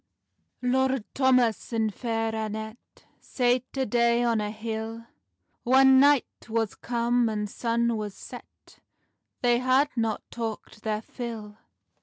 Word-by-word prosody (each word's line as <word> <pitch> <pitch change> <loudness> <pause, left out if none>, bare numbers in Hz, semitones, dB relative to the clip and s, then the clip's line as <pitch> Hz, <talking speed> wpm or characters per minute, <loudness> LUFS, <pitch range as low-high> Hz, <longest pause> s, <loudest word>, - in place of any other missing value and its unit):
182.) 250 +1 +1 0.2
LORD 230 -6 -6
THOMAS 255 -4 +2
and 220 -2 0
Fair 225 -1 -2
Annet 220 +1 -4 0.4
Sate 250 +1 -1
a' 265 - +1
day 235 +1 +2
on 230 -2 +1
a 210 - -2
hill; 225 +1 -5 0.6
Whan 265 +1 +6
night 280 -4 +2
was 225 -2 0
cum, 240 0 0
and 210 -1 -2
sun 235 +2 0
was 210 -2 -5
sett, - - -13 0.6
They 240 -1 +4
had 260 +3 +3
not 225 -3 -1
talkt 225 -2 -6
their 215 -1 -2
fill. 225 -4 -7
230 Hz, 130 wpm, -26 LUFS, 220-245 Hz, 0.6 s, Whan